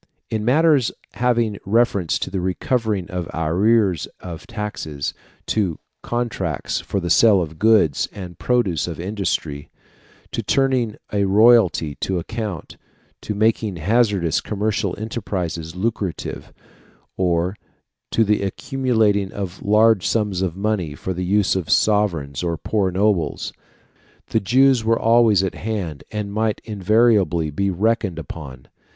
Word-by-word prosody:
In 110 -1 -1
matters 140 +1 +3 0.2
having 120 -4 0
reference 100 -4 +1
to - - -4
the 95 -2 -2
recovering 100 +1 -1
of 90 -2 -4
arrears 95 +3 +2
of 90 +5 -9
taxes, 105 - -4 0.3
to 95 -7 0 0.2
contracts 115 - -2
for 100 - -2
the 85 -2 -2
sale 110 -4 +6
of 80 -2 -5
goods 105 -10 +3
and 90 -4 -9
produce 100 -12 +1
of 85 -2 -6
industry, 85 -6 -3 0.6
to - - -2
turning 130 -5 +1 0.2
a 100 -1 +2
royalty 100 -6 +4
to 95 - -1
account, 105 -1 -5 0.4
to 105 - -4
making 110 -1 +1
hazardous 100 -1 +1
commercial 105 -2 -1
enterprises 90 -7 -4
lucrative, 100 -2 -3 0.6
or 90 +1 0 0.5
to 115 - +2
the 105 -1 +1
accumulating 105 -2 0
of 95 -3 -6
large 105 -1 +4
sums 105 -5 0
of 95 -2 -2
money 100 -7 -1
for 95 - -4
the 90 +1 -3
use 100 +1 +2
of 90 -4 -3
sovereigns 85 -10 +1
or 85 -2 -1
poor 95 +6 0
nobles, 95 -2 0 0.8
the - - +2
Jews 130 +3 +3
were 115 +1 +2
always 115 -4 +4
at 95 - -1
hand, 95 -9 -4
and 105 -2 -4
might 110 0 0
invariably 105 -5 +2
be 100 +6 0
reckoned 100 -1 0
upon. 70 -4 -8
100 Hz, 130 wpm, -21 LUFS, 90-110 Hz, 0.8 s, sale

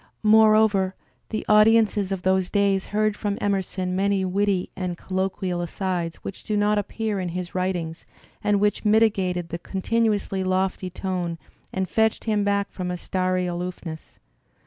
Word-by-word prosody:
More 215 0 +6
over, 195 -3 +2 0.3
the 215 - -3
audiences 210 -2 +4
of 190 -2 -3
those 190 -1 +2
days 200 -2 +1
heard 215 0 +1
from 205 -1 -2
Emerson 190 -2 -1
many 195 0 +1
witty 195 0 0
and 180 -2 -3
colloquial 185 -1 -2
asides 175 -1 -2
which 195 - -7
do 215 - -1
not 205 0 +2
appear 210 0 -2
in 180 -1 -2
his 175 0 -5
writ 185 0 0
ings 165 -2 -5 0.4
and 205 -1 +2
which 205 0 +1
mitigated 200 -5 +2
tlie 170 +1 -5
continuously 205 0 0
lofty 185 0 0
tone 180 -2 -3 0.3
and 190 0 -2
fetched 220 +2 +1
him 210 -2 +1
back 200 0 0
from 180 -2 -4
a 180 - -2
starry 185 0 -1
aloofness. 175 -2 -6
190 Hz, 155 wpm, -24 LUFS, 180-205 Hz, 0.4 s, More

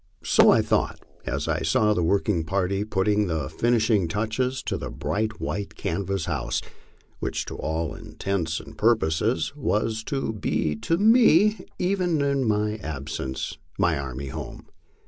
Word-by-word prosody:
So - - +5
I - - +5
thought, - - 0 0.3
as - - -2
I 80 0 0
saw 105 +7 +3
the 90 - 0
working 90 0 +1
party 95 +3 0
putting 105 0 +1
the 80 -5 -1
finishing 110 -5 +2
touches 115 +7 -1
to - - -2
the - - -4
bright 110 +1 -2
white 100 -1 -4
canvas 95 +1 -2
house, 75 -7 -1 0.6
which - - -2
to - - -6
all 80 +1 -2
intents 85 -5 -3
and 75 -2 -12
purposes 110 - +1
was 110 -5 0
to 135 -5 -2
be 80 -7 -1
to 165 - 0
me, 215 -1 +5
even 180 -3 +1
in 140 -5 +2 0.3
absence, 70 -3 -4 0.2
my 85 -2 +2
army 70 -1 -5
home. - - -7
100 Hz, 145 wpm, -25 LUFS, 80-120 Hz, 0.6 s, So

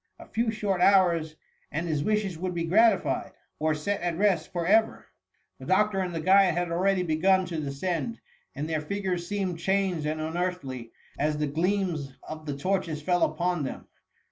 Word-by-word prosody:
A - - -12
few 230 +1 -1
short 205 -4 -1
hours, 175 -5 +4 0.4
and 165 +4 -2
his 150 -3 0
wishes 210 -3 0
would 180 +2 -4
be 170 - -1
gratified, 190 - +2 0.3
or 155 0 +1
set 195 +6 -2
at 175 -2 -1
rest 190 -5 +1
for 175 -2 -2
ever. 220 +4 +3 0.5
The - - -10
doctor 205 +1 +2
and 180 -2 -2
the - - -1
guide 185 +1 +5
had 175 -1 -1
already 185 +2 +2
begun 185 +3 +3
to 165 -3 -4
descend, 170 - -3 0.4
and 150 - -3
their 160 -2 -1
figures 180 0 -3
seemed 190 -4 -2
changed 190 -4 0
and 155 +1 -2
unearthly 155 -7 -3 0.3
as 150 +1 +1
the 150 - 0
gleams 165 -2 -1
of 155 0 -8
the 140 -1 -3
torches 180 -1 -1
fell 175 +2 +1
upon 175 -1 +1
them. 135 - -6
175 Hz, 175 wpm, -27 LUFS, 155-195 Hz, 0.5 s, guide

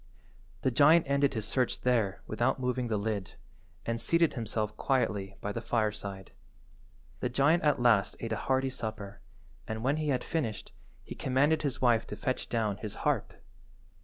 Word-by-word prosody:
The 130 - +2
giant 155 +6 +6
ended 140 -1 +2
his 110 -1 -3
search 125 0 0
there 115 -6 +1
without 120 +5 0
moving 125 -1 -1
the 110 -2 0
lid, 100 -2 -3 0.5
and 115 0 -2
seated 170 +4 +3
himself 110 -3 -2
quietly 105 -7 0
by 100 - -3
the 115 - -4
fireside. 105 -4 -2 0.9
The 125 - -1
giant 140 +7 +3
at 150 -4 +2
last 115 -6 +3
ate 115 - -5
a - - +1
hearty 130 0 +2
supper, 105 -5 -6 0.5
and 110 0 -4
when 140 +4 +2
he 155 -1 -2
had 130 -3 0
finished, 135 -11 -3 0.3
he - - -8
commanded 140 +5 +2
his 140 -3 -3
wife 120 -2 +3
to - - -5
fetch 130 +4 -3
down 110 -4 0
his 105 0 -6
harp. - - +1
120 Hz, 165 wpm, -30 LUFS, 110-135 Hz, 0.9 s, giant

